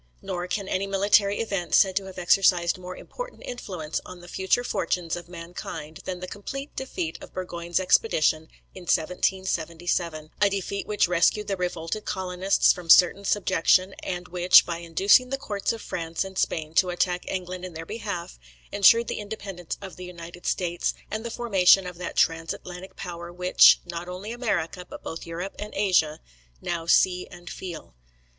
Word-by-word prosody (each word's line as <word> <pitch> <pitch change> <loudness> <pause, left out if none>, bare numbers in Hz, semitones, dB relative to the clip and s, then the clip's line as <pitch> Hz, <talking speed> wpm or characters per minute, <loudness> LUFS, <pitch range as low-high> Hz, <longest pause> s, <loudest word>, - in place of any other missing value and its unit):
Nor 180 -2 -3
can 195 +1 -3
any 195 +1 -1
military 200 +1 +3
event 195 -7 -2
be - - +7
said 190 -2 +5
to 195 - -1
have 190 -1 -10
exercised 180 -1 +3
more 185 0 -8
important - - -8
influence 180 -10 -5
on 180 - -10
the 175 - -13
future 190 +7 +1
fortunes 170 -6 -1
of 175 0 -9
mankind, 165 -3 -8
than 180 -1 -4
the 185 - -6
complete 275 +9 -7
defeat 180 -11 -4
of - - -12
Burgoyne's 175 -1 -2
expedition 160 -4 +2 0.3
in 185 -2 -10
1777; 170 -2 -1
a 205 - +6
defeat 200 0 -3
which 210 -3 +2
rescued 180 +4 +2
the 195 - 0
revolted 180 +2 -3
colonists 185 0 +2
from 175 -2 -10
certain 185 +4 +7
subjection; 190 -1 +2
and 180 -1 -4
which, 180 0 +6
by 170 -1 -3
inducing 190 +9 +4
the 270 - -1
courts 205 -8 -2
of 225 -1 -6
France 165 -1 -3
and 190 -1 -5
Spain 155 -1 -1
to 180 +2 +3
attack 180 0 0
England 185 -1 -4
in 180 -3 -7
their 165 +1 -6
behalf, 180 - -5 0.3
ensured 230 +3 +6
the - - -3
independence 195 -4 -6
of 190 - -9
the 180 - -7
United 175 0 -9
States, 175 -2 -1 0.2
and 220 +1 -3
the 235 - -4
formation 195 -5 +4
of 180 -1 -8
that 180 - -5
trans 165 0 +1
Atlantic 180 +1 -10
power 175 -1 -7
which, 180 +1 +6
not 175 0 -6
only 185 +4 -6
America, 205 -7 -2
but - - -11
both 165 - -6
Europe 175 +4 -5
and 210 0 -6
Asia, 180 -6 +2 0.4
now 165 - -3
see 180 +1 +3
and 175 0 -11
feel. 170 - -8
180 Hz, 175 wpm, -26 LUFS, 170-195 Hz, 0.4 s, be